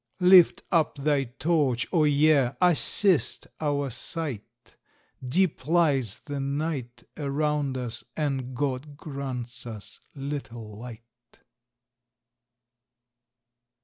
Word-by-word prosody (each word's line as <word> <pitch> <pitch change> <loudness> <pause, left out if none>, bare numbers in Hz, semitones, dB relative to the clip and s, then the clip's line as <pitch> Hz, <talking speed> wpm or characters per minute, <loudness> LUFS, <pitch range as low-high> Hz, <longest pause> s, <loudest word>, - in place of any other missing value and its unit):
Lift 180 -1 +7
up 165 -4 +2
thy 140 -1 +1
torch, 135 -1 0
O 160 -4 +4
Year! 145 -3 +3
assist 180 - +2
our 145 -3 -1
sight! 120 - -5 0.5
Deep 145 0 0
lies 145 - +2
the 145 -1 -5
night 140 -3 -3
Around 145 -1 -1
us, 120 -2 -4
and 135 -4 -2
GOD 140 +2 -3
grants 130 -5 -6
us 110 -3 -9 0.2
little 135 -6 -6
light! 120 0 -13
140 Hz, 90 wpm, -26 LUFS, 125-150 Hz, 0.5 s, Lift